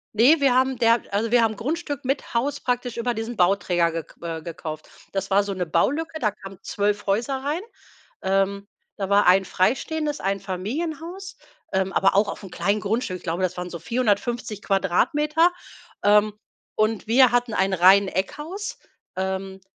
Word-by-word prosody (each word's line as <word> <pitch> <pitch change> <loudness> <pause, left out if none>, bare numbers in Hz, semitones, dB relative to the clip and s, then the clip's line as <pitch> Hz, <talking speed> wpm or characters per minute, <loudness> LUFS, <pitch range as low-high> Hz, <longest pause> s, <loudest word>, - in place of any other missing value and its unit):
Ne, 255 +9 +6
wir 275 -3 +3
haben 260 0 +2
der 230 0 +4
also 220 +3 0
wir 240 -1 +5
haben 220 -1 +1
Grundstück 290 +2 -4
mit 270 +2 -2
Haus 275 +4 0
praktisch 245 -1 -2
über 240 +1 -1
diesen 225 +1 -5
Bauträger 180 -2 +2
ge 165 -1 -4 0.2
äh, 165 -1 -4
gekauft. 155 -2 -7 0.2
Das 195 0 -3
war 200 +1 +4
so' 200 -1 -4
ne 185 -1 -2
Baulücke, 290 - 0
da 215 -6 +1
kamen 195 -2 -12
12 205 +1 -1
Häuser 235 +7 0
rein. 305 +6 -1 0.6
Ähm. 195 +1 0 0.3
Da 195 - -1
war 200 +1 +4
1 190 +2 +5
freistehendes 295 - 0
Einfamilienhaus, 280 - -4 0.4
ähm, 190 0 0
aber 195 0 +3
auch 205 - +4
aufm 195 - -7
kleinen 200 +5 0
Grundstück. 215 -2 -1
Ich - - -20
glaube, 175 +2 -2
das 180 0 -2
waren 180 0 -5
so 170 - -6
450 220 +1 -1
Quadratmeter, 300 - +2 0.5
ähm, 210 +1 +4 0.4
und 215 0 0
wir 250 +2 +5
hatten 245 -1 +1
ein 190 0 +1
Reiheneckhaus. 200 - +2 0.4
Ähm. 190 0 -3
205 Hz, 160 wpm, -24 LUFS, 190-255 Hz, 0.6 s, Ne